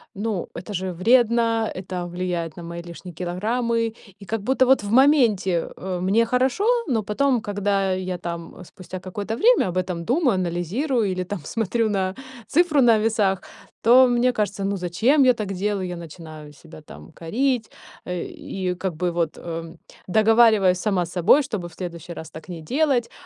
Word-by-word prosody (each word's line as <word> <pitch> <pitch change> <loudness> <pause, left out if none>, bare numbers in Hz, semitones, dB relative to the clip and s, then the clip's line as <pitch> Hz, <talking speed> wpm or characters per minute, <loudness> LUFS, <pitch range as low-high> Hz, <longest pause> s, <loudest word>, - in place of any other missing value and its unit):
ну, 205 -3 -3
это 180 +5 -7
же 190 0 -2
вредно, 230 +3 +2
это 185 -1 -5
влияет 175 -2 -3
на 175 - -8
мои 170 +1 -6
лишние 175 +1 -10
килограммы. 225 +6 -1 0.3
И - - -10
как 225 +1 -3
будто 260 +4 +2
вот 265 -3 +4
в 205 - -4
моменте, 230 - +3
э, 185 -1 -4
мне 200 +6 +2
хорошо, 255 - +1 0.2
но 230 -6 0
потом, 245 +4 +1
когда 200 -2 0
я 185 -1 -3
там, 170 -1 -6
э, - - -11
спустя 185 +1 -9
какое-то 200 +4 -5
время, 470 - +4
об 180 - -4
этом 180 -2 -2
думаю, 255 - +2
анализирую 190 - -1
или 185 0 -2
там 195 +2 -5
смотрю 225 +5 -1
на 190 -2 -1 0.3
цифру 315 -3 +3
на 235 -3 +5
весах, 210 -4 +1 0.4
то 255 +3 +7
мне 245 +1 +2
кажется: 205 -4 -2
"Ну, 200 0 -1
зачем 220 - +2
я 250 - +6
так 210 -4 -4
делаю?" 195 0 -2
Я 180 - -5
начинаю 155 -2 -10
себя 155 +1 -14
там 75 - -13
корить, 240 +7 -1 0.4
э, 180 -1 -3
и 185 -2 -4
как 185 -1 -4
бы 175 +2 -1
вот, 170 -2 -2
эм, 165 0 -7 0.3
договариваюсь 215 -2 +4
сама 190 -3 0
с 170 - -11
собой, 185 - +4
чтобы 210 -10 -4
в - - -19
следующий 170 -1 -7
раз 160 0 -9
так 160 +3 -11
не 170 -2 -7
делать. 260 - 0
195 Hz, 180 wpm, -23 LUFS, 175-230 Hz, 0.4 s, то